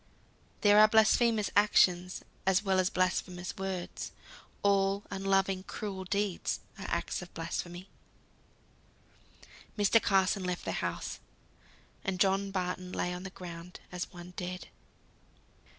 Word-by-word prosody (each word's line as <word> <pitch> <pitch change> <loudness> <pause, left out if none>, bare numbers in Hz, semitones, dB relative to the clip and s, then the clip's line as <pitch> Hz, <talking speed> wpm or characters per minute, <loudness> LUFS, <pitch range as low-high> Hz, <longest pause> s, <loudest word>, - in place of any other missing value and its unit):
There 205 0 +7
are 215 - +9
blasphemous 220 0 +4
actions 180 -3 +4 0.2
as 190 +2 +4
well 190 -2 +2
as 185 0 +3
blasphemous 185 -1 -1
words: 190 -2 -4 0.5
all 200 0 +3
unloving, 195 -1 +1
cruel 190 -1 -5
deeds 200 -1 -1 0.2
are - - -5
acted 175 -1 -3
blasphemy. 175 +2 -4 1.9
Mr. 210 +2 +5
Carson 195 0 +2
left 180 -1 -3
the - - -1
house. - - -3 0.8
And 190 -2 -2
John 195 +2 +3
Barton 180 -1 -3
lay 180 - -1
on 180 - -5
the 190 - -6
ground 175 -1 -9
as 180 0 -4
one 175 -1 -10
dead. 180 0 -5
190 Hz, 120 wpm, -31 LUFS, 180-200 Hz, 1.9 s, are